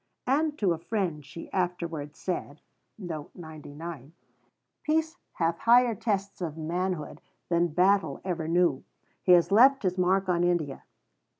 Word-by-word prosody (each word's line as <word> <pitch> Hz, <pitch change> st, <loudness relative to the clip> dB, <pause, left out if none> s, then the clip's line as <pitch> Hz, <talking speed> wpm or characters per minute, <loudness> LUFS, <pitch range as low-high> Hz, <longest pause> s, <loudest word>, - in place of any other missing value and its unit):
And 295 Hz, +3 st, +1 dB
to 195 Hz, -, +2 dB
a 165 Hz, -, -6 dB
friend 175 Hz, -6 st, -2 dB
she 150 Hz, +4 st, -10 dB
afterwards 170 Hz, -5 st, -3 dB
said: 155 Hz, -5 st, -4 dB, 2.2 s
"Peace 320 Hz, +2 st, 0 dB, 0.2 s
hath 165 Hz, 0 st, -1 dB
higher 240 Hz, 0 st, +5 dB
tests 200 Hz, -3 st, -2 dB
of 160 Hz, -3 st, -4 dB
manhood 170 Hz, 0 st, -3 dB, 0.3 s
than 170 Hz, 0 st, +3 dB
battle 190 Hz, +5 st, +2 dB
ever 170 Hz, -4 st, -3 dB
knew. 170 Hz, -5 st, +2 dB, 0.4 s
He 180 Hz, -, +5 dB
has 175 Hz, +2 st, +4 dB
left 260 Hz, +5 st, +6 dB
his 185 Hz, -1 st, 0 dB
mark 190 Hz, +2 st, +2 dB
on 175 Hz, -1 st, +2 dB
India. 175 Hz, -6 st, -1 dB
180 Hz, 125 wpm, -28 LUFS, 165-200 Hz, 2.2 s, left